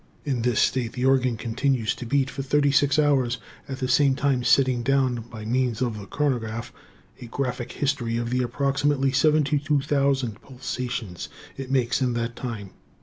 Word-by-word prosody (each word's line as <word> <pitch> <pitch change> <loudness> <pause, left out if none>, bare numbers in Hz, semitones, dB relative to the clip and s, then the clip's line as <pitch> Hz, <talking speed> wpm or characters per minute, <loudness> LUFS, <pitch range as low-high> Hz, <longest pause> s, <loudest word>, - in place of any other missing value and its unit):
In 130 -5 -1
this 120 -1 +1
state 120 -3 +1
the 125 0 -2
organ 130 -3 +3
continues 120 0 0
to 120 - -8
beat 135 +2 +2
for 135 - -4
thirty 145 +1 +2
six 140 +1 +3
hours, 135 -5 +2 0.3
at 135 - -4
the 130 -2 -2
same 135 +1 +4
time 135 -3 +1
setting 130 -1 +3
down, 130 -2 +1
by 110 -2 -8
means 125 -1 0
of 120 -4 -1
the 100 - -9
chronograph, 115 -5 -2 0.5
a 120 - -7
graphic 125 -1 -3
history 130 -5 -1
of 120 0 -2
the 125 0 +1
approximately 135 +2 +1
72,000 140 -4 +1
pulsations 125 -7 -5 0.3
it 135 -1 -7
makes 125 -1 +1
in 125 -2 +1
that 115 0 -2
time. 110 -6 -6
130 Hz, 165 wpm, -25 LUFS, 120-140 Hz, 0.5 s, same